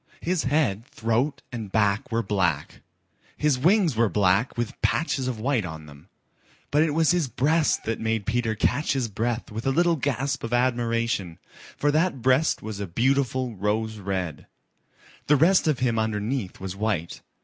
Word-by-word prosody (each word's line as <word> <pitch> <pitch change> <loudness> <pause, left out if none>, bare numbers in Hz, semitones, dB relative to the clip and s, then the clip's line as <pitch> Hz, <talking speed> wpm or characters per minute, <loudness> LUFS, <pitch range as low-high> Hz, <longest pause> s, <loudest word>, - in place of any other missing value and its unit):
His 175 0 -1
head, 130 -6 0
throat 115 +6 -1
and 110 -5 -6
back 105 0 +1
were 115 0 0
black. 90 -8 -1 0.6
His 150 -4 +1
wings 175 - +3
were 115 -1 +3
black 100 +6 +2
with 120 -2 -4
patches 140 -5 0
of 125 -4 -3
white 125 -1 0
on 80 -3 -7
them. 75 +3 -15 0.6
But 150 - +3
it 155 -2 +1
was 160 0 +4
his 175 -5 +1
breast 150 +5 +1
that 115 - -2
made 110 -2 -1
Peter 115 0 0
catch 145 +7 +1
his 130 -4 -1
breath 115 +3 -3
with 110 +4 -4
a - - +3
little 170 +3 +2
gasp 135 -1 -2
of 115 +1 -4
admiration, 115 -7 0 0.4
for 145 - +2
that 155 -5 0
breast 130 +5 +2
was 110 -1 -5
a 100 - -3
beautiful 130 +4 0
rose 105 +2 -1
red. 95 -5 -4 0.8
The 150 - +5
rest 170 +4 +4
of 150 -4 +2
him 120 -3 0
underneath 110 0 -2
was 95 -1 -5
white. 100 -5 -2
115 Hz, 170 wpm, -25 LUFS, 105-140 Hz, 0.8 s, The